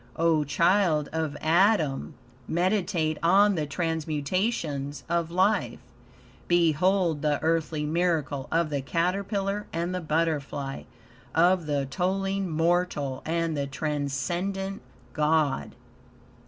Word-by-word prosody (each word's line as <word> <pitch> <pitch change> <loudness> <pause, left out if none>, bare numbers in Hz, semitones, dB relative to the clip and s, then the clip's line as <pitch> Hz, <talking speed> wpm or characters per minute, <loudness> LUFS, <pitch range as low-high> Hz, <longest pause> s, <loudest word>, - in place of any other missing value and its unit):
O 165 -2 +2
child 170 0 +2
of 160 -3 -2
Adam! 165 -4 +2 0.3
Meditate 175 -3 0
on 200 +5 +5
the 155 -5 -2
transmutations 155 -1 -2
of 170 -1 0
life. 190 +5 +1 0.7
Behold 175 0 +2
the 150 -1 +1
earthly 160 -2 0
miracle 155 -4 0
of 165 -1 +1
the 140 -1 -1
caterpillar 195 +6 -1
and 170 +2 -2
the 180 - -2
butterfly, 150 -4 -2 0.5
of 175 0 +3
the 145 -2 0
toiling 195 +5 -1
mortal 160 -4 0
and 165 -1 0
the 140 -1 -2
transcendent 155 +7 -3 0.3
God! 150 -2 +1
165 Hz, 100 wpm, -27 LUFS, 150-185 Hz, 0.7 s, on